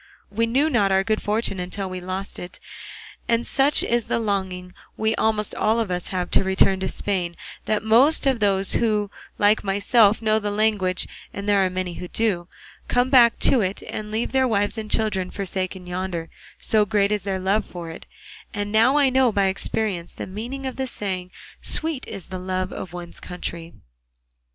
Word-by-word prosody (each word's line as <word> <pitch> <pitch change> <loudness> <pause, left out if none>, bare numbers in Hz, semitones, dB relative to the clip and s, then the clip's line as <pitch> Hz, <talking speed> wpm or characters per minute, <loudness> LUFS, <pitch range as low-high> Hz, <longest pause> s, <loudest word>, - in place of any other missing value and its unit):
We 230 +2 +1
knew 270 +7 +2
not 215 -10 +2
our 190 0 +3
good 215 +1 0
fortune 210 -2 -1
until 185 +2 -3
we 185 -1 -6
lost 185 +2 -5
it; 175 0 -8 0.7
and 230 0 +1
such 275 +2 +2
is 235 -1 0
the - - 0
longing 190 -4 -2 0.2
we 220 0 +1
almost 215 -1 0
all 220 +2 +1
of 220 -5 -1
us 180 -1 -2
have 180 -2 -3
to - - +4
return 190 0 +3
to 190 - -2
Spain, 180 -4 0 0.3
that 215 0 0
most 250 +9 +5
of 265 -3 +2
those 195 -2 +2
who 210 -3 +1 0.3
like 205 +1 +3
myself 205 +2 +3
know 220 -1 +2
the 210 -1 -3
language, 205 -3 0 0.2
and 200 0 -6
there 200 -1 +4
are 185 - +1
many 185 -1 -3
who 180 - -7
do, 185 -5 -1 0.4
come 245 +1 +1
back 240 -4 +6
to 255 - +5
it 190 0 -2
and 210 0 -5
leave 220 +2 -2
their 265 -1 +3
wives 205 -2 +1
and 220 -2 -5
children 205 -5 0
forsaken 190 -1 -4
yonder, 180 -2 -4 0.3
so 215 -1 +2
great 205 -1 +1
is 210 -1 0
their 195 0 -2
love 195 +3 +1
for 170 -3 -8
it; - - -11 0.5
and 205 0 -3
now 230 +6 +4
I 280 -3 +4
know 260 -2 +4
by 200 -2 +2
experience 190 -2 -1
the - - -5
meaning 235 +8 -6
of 260 - -4
the 265 0 -2
saying, 185 -6 -4 0.3
sweet 315 -4 0
is 190 - -7
the 185 -1 -5
love 185 0 -3
of 180 - -6
one's 175 -1 -7
country. 170 -2 -7
205 Hz, 190 wpm, -23 LUFS, 185-225 Hz, 0.7 s, back